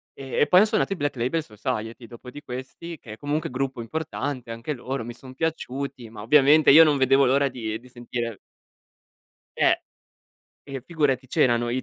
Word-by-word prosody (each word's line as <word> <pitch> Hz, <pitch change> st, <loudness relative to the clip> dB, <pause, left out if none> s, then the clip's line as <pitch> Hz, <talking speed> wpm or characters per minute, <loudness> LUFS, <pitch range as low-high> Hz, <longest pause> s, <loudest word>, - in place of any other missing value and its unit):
e 135 Hz, -2 st, -4 dB
e -, -, +4 dB
poi 180 Hz, -, +6 dB
han 215 Hz, -, +4 dB
suonato 200 Hz, -, 0 dB
i -, -, -4 dB
Black 145 Hz, -3 st, -2 dB
Label 130 Hz, +7 st, 0 dB
Society, 110 Hz, +1 st, -5 dB
dopo 120 Hz, +1 st, -11 dB
di 145 Hz, +3 st, -10 dB
questi 130 Hz, +7 st, -8 dB
che 110 Hz, -4 st, -10 dB
è -, -, -11 dB
comunque 150 Hz, +2 st, -2 dB
gruppo 130 Hz, -1 st, -3 dB
importante, 140 Hz, -2 st, -4 dB
anche 115 Hz, +6 st, -4 dB
loro 125 Hz, -1 st, -4 dB
mi 120 Hz, -, -6 dB
son 130 Hz, +2 st, -13 dB
piaciuti, 140 Hz, -5 st, -4 dB
ma 110 Hz, -2 st, -10 dB
ovviamente 145 Hz, +5 st, +5 dB
io 160 Hz, +3 st, +10 dB
non 150 Hz, -3 st, +3 dB
vedevo 135 Hz, +1 st, +4 dB
l'ora 140 Hz, +2 st, +3 dB
di 110 Hz, -2 st, -5 dB
di 125 Hz, +2 st, -17 dB
sentire 120 Hz, -3 st, -5 dB, 1.2 s
Eh! -, -, +3 dB, 0.9 s
E, 135 Hz, -2 st, -6 dB
figurati 140 Hz, -6 st, 0 dB
c'erano 120 Hz, -1 st, +2 dB
i 130 Hz, +1 st, -1 dB
130 Hz, 185 wpm, -24 LUFS, 120-145 Hz, 1.2 s, io